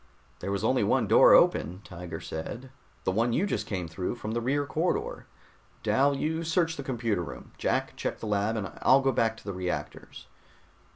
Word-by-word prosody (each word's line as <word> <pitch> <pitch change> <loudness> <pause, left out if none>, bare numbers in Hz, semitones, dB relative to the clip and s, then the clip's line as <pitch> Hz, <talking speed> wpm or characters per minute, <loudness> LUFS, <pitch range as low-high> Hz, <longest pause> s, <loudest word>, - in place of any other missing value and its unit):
"There 100 - -4
was 100 +1 -2
only 130 0 +2
one - - +2
door - - +7
open," 90 +4 +3
Tiger 85 -2 -7
said. 120 +11 -6 0.3
"The - - +1
one 115 +4 +1
you 185 - +2
just 110 - -2
came 90 -4 -3
through, 90 +7 -3
from 110 -2 -5
the 120 +1 -1
rear 140 +4 0
corridor. 160 +5 -2 0.6
Dal, 140 +1 +3
you 160 +3 -1
search 165 0 +1
the - - -5
computer 115 -7 -1
room. 85 - -8
Jack, - - 0
check - - -3
the - - -6
lab 105 +1 0
and 100 -3 -4
I'll 135 +1 +6
go 135 0 +2
back 115 -2 +1
to - - -14
the 100 - -5
reactors." 90 -1 -5
115 Hz, 190 wpm, -28 LUFS, 95-135 Hz, 0.6 s, door